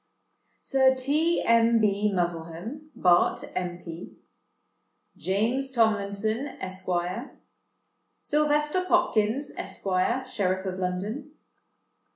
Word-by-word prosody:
"Sir 265 -1 +3
T. 300 +6 +1
M. 230 0 +4
B. 210 -1 +2
Muzzlehem, 175 - -4
Bart., 180 -7 +3
M.P. 175 -2 -5 1.0
"James 230 +8 0
Tomlinson, 220 +1 +1
Esq. 185 0 -6 1.3
"Sylvester 300 +3 +1
Popkins, 280 -7 +1
Esq., - - -6 0.4
Sheriff 190 -6 -1
of 185 0 -4
London. 205 +11 -3
220 Hz, 80 wpm, -27 LUFS, 185-270 Hz, 1.3 s, M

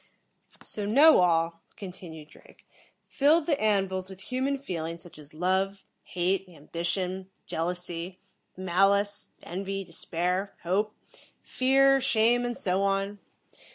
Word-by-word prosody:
"So, 205 -1 -2
Knowall," 180 - +5 0.2
continued 170 -5 -10
Drake, - - -19 0.4
"filled 300 +3 +3
the 295 -3 0
An 205 -3 +3
vils 190 0 -5
with 190 0 -11
human 265 +2 0
feelings 170 -10 -5
such 175 -3 -14
as 150 0 -14
Love, 190 +3 0 0.2
Hate, 185 +1 -1
Ambition, 180 +4 -4 0.2
Jealousy, 175 +1 -4 0.4
Malice, 195 +3 +2
Envy, 195 +2 -4
Despair, 180 +2 -2
Hope, 205 +5 0 0.5
Fear, 270 +1 +3
Shame 245 -1 +3
and 240 0 -3
so 185 +1 0
on. 195 +1 0
190 Hz, 115 wpm, -28 LUFS, 175-210 Hz, 0.5 s, Knowall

